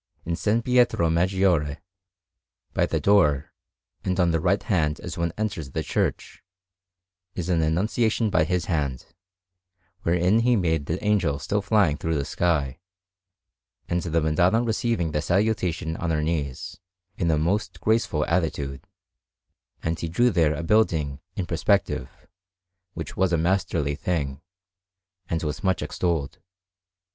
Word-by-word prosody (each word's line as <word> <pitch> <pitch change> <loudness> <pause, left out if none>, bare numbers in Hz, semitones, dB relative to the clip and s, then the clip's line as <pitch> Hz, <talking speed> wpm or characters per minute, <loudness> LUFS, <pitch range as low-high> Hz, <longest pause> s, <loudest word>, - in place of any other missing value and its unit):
In 85 - -3
S. 85 +5 -3 0.2
Pietro 125 -10 +3
Maggiore, 85 -4 +2 1.0
by - - +2
the - - -1
door, 75 -8 +3 0.5
and 95 0 -1
on 85 -2 +3
the 80 - +1
right 90 +5 +1
hand 80 -6 0
as 85 -1 -6
one 85 -1 -1
enters 100 -9 -3
the - - -3
church, - - -2 0.9
is 90 -1 -3
an 85 -2 +2
Annunciation 105 +7 +1
by - - +3
his 90 -2 -1
hand, 70 -7 -2 1.0
wherein 90 +5 +2
he 120 +1 +3
made 80 -7 0
the 80 +3 -3
Angel 95 -9 +2
still 105 +7 -1
flying 100 -7 +2
through 80 0 -2
the 70 -2 -1
sky, 75 -3 0 1.1
and 85 0 0
the 85 -1 0
Madonna 90 +9 +2
receiving 115 -7 0
the 75 - 0
Salutation 90 -4 0
on 85 - -2
her 75 -2 0
knees, 75 -5 -3 0.4
in 85 - +1
a 80 - +3
most 90 +7 -1
graceful 110 -9 +1
attitude; 75 -5 -2 1.0
and 80 +1 -1
he 85 - -3
drew 120 +9 +3
there 80 -5 +2
a 80 - -4
building 80 -8 +1 0.2
in 95 - -2
perspective, 65 -5 0 0.9
which 80 -3 -6
was 95 -1 +1
a 85 - +3
masterly 85 -4 0
thing, 70 -3 -2 0.9
and 85 0 -1
was 75 -2 -4
much 95 -2 +1
extolled. 80 -7 -2
85 Hz, 140 wpm, -25 LUFS, 75-95 Hz, 1.1 s, Pietro